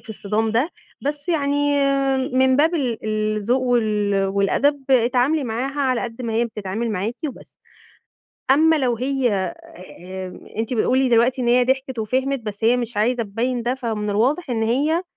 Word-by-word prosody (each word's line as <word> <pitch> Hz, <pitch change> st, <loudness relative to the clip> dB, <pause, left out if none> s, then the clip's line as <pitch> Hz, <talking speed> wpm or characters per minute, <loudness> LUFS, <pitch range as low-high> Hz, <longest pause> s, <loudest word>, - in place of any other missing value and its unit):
في -, -, -21 dB
الصِدام 215 Hz, +1 st, -1 dB
ده، 250 Hz, +9 st, +1 dB, 0.3 s
بس 290 Hz, +3 st, -4 dB
يعني 290 Hz, -2 st, +1 dB, 0.5 s
من 260 Hz, 0 st, +3 dB
باب 320 Hz, +4 st, +3 dB
ال 255 Hz, -8 st, -1 dB
الذوق 215 Hz, +3 st, 0 dB
وال 215 Hz, -5 st, +1 dB
والأدب، 265 Hz, +9 st, 0 dB
اتعاملي 255 Hz, +4 st, +3 dB
معاها 260 Hz, +5 st, -3 dB
على 255 Hz, -3 st, +1 dB
قَد 235 Hz, +1 st, -6 dB
ما 230 Hz, -2 st, -3 dB
هي 230 Hz, +2 st, +2 dB
بتتعامل 220 Hz, 0 st, -4 dB
معاكِ 210 Hz, +4 st, -2 dB
وبس. -, -, -13 dB, 0.9 s
أمّا 320 Hz, +4 st, +5 dB
لو 250 Hz, -5 st, 0 dB
هي 260 Hz, 0 st, 0 dB, 0.3 s
آآ 185 Hz, +1 st, -10 dB, 0.2 s
أنتِ 225 Hz, +3 st, -1 dB
بتقولي 255 Hz, +3 st, +2 dB
دلوقتي 245 Hz, +2 st, +3 dB
إن 240 Hz, -, 0 dB
هي 245 Hz, +1 st, +4 dB
ضحكت 260 Hz, 0 st, -1 dB
وفهمِت، 260 Hz, +4 st, -1 dB
بس 210 Hz, -1 st, -6 dB
هي 235 Hz, +2 st, +4 dB
مش 240 Hz, -3 st, -4 dB
عايزة 235 Hz, +3 st, +1 dB
تبيّن 235 Hz, +4 st, -2 dB
ده، 245 Hz, +2 st, 0 dB
فمن 220 Hz, -5 st, -3 dB
الواضح 260 Hz, -, 0 dB
إن 225 Hz, -2 st, 0 dB
هي 290 Hz, +9 st, +1 dB
245 Hz, 160 wpm, -21 LUFS, 220-270 Hz, 0.9 s, أمّا